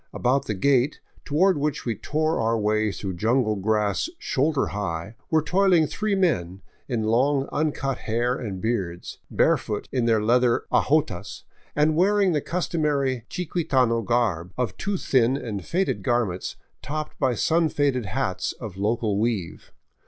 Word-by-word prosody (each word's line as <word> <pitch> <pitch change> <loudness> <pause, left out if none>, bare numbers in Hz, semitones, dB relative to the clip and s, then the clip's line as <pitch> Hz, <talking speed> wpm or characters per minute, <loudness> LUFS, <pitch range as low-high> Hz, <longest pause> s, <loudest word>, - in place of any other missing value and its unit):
About 135 +2 +1
the 105 - -1
gate, 135 +6 +2 0.3
toward 175 +3 +3
which 150 0 -2
we 120 - 0
tore 155 +8 -1
our 115 0 +1
way 110 0 +1
through 95 -1 -5
jungle 110 +4 +1
grass 105 - 0
shoulder 140 - 0
high, 95 0 -4 0.2
were 160 -1 +3
toiling 180 -1 +3
three 210 +6 -1
men 95 - 0 0.2
in 120 -4 -1
long 135 +5 +2
uncut 140 -3 -1
hair 120 +3 0
and 100 -7 -5
beards, 95 -5 -3
barefoot 105 - +1
in 125 -3 0
their 115 -2 +3
leather 120 +2 +2
ajotas, 140 - 0 0.3
and 150 +1 +3
wearing 195 +2 +3
the 150 -3 +1
customary 145 -8 -1
chiquitano 135 -10 0
garb 100 -7 0
of 120 -7 -1
two 200 0 -2
thin 130 -4 +2
and 105 -8 -5
faded 190 +3 0
garments 120 -8 -1 0.3
topped 155 +1 -5
by 130 -2 +2
sunfaded 145 - +1
hats 95 -6 -2
of 105 -6 -9
local 105 0 0
weave. 105 -7 -2
125 Hz, 145 wpm, -24 LUFS, 105-150 Hz, 0.3 s, toward